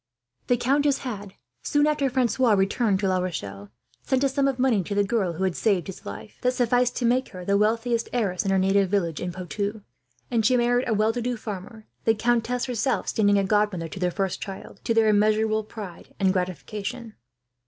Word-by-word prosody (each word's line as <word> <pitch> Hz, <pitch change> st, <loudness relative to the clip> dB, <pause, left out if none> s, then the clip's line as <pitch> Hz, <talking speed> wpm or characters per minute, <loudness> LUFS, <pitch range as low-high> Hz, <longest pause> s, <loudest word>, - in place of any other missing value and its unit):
The 245 Hz, -, +3 dB
countess 275 Hz, +3 st, +2 dB
had, 205 Hz, -7 st, -6 dB, 0.3 s
soon 290 Hz, 0 st, +2 dB
after 300 Hz, -2 st, +1 dB
Francois 250 Hz, -2 st, +2 dB
returned 195 Hz, +1 st, +2 dB
to 195 Hz, -, +1 dB
La 185 Hz, -1 st, +2 dB
Rochelle, 100 Hz, -, -5 dB, 0.3 s
sent 265 Hz, -, 0 dB
a 275 Hz, -, +3 dB
sum 275 Hz, +1 st, +1 dB
of 270 Hz, -2 st, 0 dB
money, 250 Hz, -6 st, +2 dB
to 200 Hz, +3 st, -4 dB
the 205 Hz, -, +3 dB
girl 200 Hz, -4 st, 0 dB
who 175 Hz, +4 st, -3 dB
had 185 Hz, -3 st, 0 dB
saved 195 Hz, -5 st, +1 dB
his 190 Hz, -, -9 dB
life, 215 Hz, -, -9 dB
that 250 Hz, 0 st, +2 dB
sufficed 245 Hz, 0 st, +2 dB
to 245 Hz, -, -1 dB
make 250 Hz, +2 st, +2 dB
her 180 Hz, -1 st, -9 dB
the 200 Hz, -, +2 dB
wealthiest 230 Hz, +3 st, +1 dB
heiress 205 Hz, -7 st, 0 dB
in 195 Hz, -, -1 dB
her 195 Hz, -, +3 dB
native 195 Hz, 0 st, +3 dB
village 175 Hz, -5 st, 0 dB
in 180 Hz, -, -3 dB
Poitou; 200 Hz, +4 st, -4 dB, 0.5 s
and 230 Hz, -2 st, +2 dB
she 250 Hz, +4 st, +4 dB
married 245 Hz, +1 st, +2 dB
a -, -, +2 dB
well 215 Hz, +2 st, +2 dB
to 245 Hz, -, -3 dB
do 245 Hz, 0 st, -2 dB
farmer, 215 Hz, +1 st, -7 dB, 0.2 s
the 225 Hz, -, +4 dB
countess 240 Hz, +2 st, 0 dB
herself 250 Hz, +1 st, -1 dB
standing 205 Hz, -2 st, +3 dB
as 195 Hz, -1 st, +1 dB
godmother 205 Hz, -5 st, +1 dB
to 190 Hz, -, -8 dB
their 180 Hz, -1 st, +1 dB
first 190 Hz, 0 st, -2 dB
child, 195 Hz, -2 st, -8 dB
to 230 Hz, -, +1 dB
their 225 Hz, -1 st, +4 dB
immeasurable 215 Hz, +1 st, +3 dB
pride 205 Hz, -5 st, -10 dB
and 190 Hz, -2 st, +3 dB
gratification. 210 Hz, +5 st, -4 dB
215 Hz, 205 wpm, -25 LUFS, 195-245 Hz, 0.5 s, she